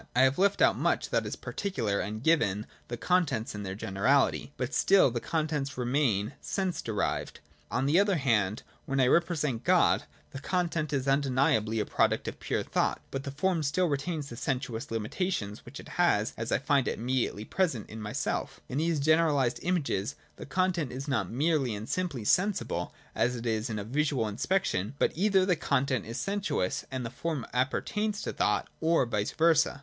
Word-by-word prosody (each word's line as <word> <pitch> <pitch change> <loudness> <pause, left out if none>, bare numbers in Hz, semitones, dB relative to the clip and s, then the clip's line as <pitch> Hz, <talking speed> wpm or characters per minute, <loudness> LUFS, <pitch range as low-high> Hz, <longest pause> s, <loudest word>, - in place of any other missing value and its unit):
I 125 - +6
have 130 +3 +3
left 200 +1 +3
out - - +5
much - - 0
that - - +1
is - - -4
particular 115 - -2
and 105 +4 -4
given 105 -11 +2 0.2
the 120 - -4
contents 170 -9 +1
in 105 - -5
their 95 -1 -4
generality: 110 +9 +1
but 130 +2 -3
still 190 -9 +5
the 120 - -2
contents 150 -3 -2
remain 125 -4 +1
sense 190 -3 -2
derived.' 105 -3 -2 0.3
On 130 - 0
the 150 +6 +4
other 200 -1 +3
hand, 110 - +1 0.2
when 135 0 0
I 130 - +5
represent 150 -4 +1
God, - - +3 0.3
the 135 - -6
content 165 -2 -1
is 135 -2 -1
undeniably 130 -5 +2
a 105 - 0
product - - +1
of - - -5
pure - - -1
thought, - - 0
but 135 +1 -4
the - - -3
form 165 +5 0
still 155 +5 +1
retains 145 -1 -2
the 120 - -7
sen 130 +1 -1
suous 120 -3 -6
limitations 115 - -3
which 130 - -9
it - - -11
has 110 -12 +2
as 115 0 -4
I - - +4
find 140 -1 +1
it - - -1
immediately 120 -3 -1
present 160 - -1
in 110 +1 -8
myself 105 0 -3
In 130 - -2
these 165 -1 +1
generalised 145 -5 +3
images 140 - -1 0.2
the - - -9
content 180 -7 0
is 135 +3 -6
not 110 -10 0
merely 140 -2 +1
and 105 +2 -6
simply 165 -12 -2
sensible, 180 - +1 0.2
as 125 +1 +1
it 120 0 -6
is 110 0 -1
in 110 - -3
a 105 - -3
visual 140 +1 0
inspec 185 - 0
tion; 100 +8 -2
but - - +2
either 190 +1 +3
the 185 -2 +3
content 140 -5 0
is 115 - -5
sensuous 195 - -1
and 130 -2 -4
the 115 - -5
form 160 -7 -3
apper 130 +1 +1
tains 210 0 -2
to - - -3
thought, - - +1
or 160 -4 +3
vice 105 -3 -1
versa. 160 -3 +3
135 Hz, 190 wpm, -29 LUFS, 115-165 Hz, 0.3 s, I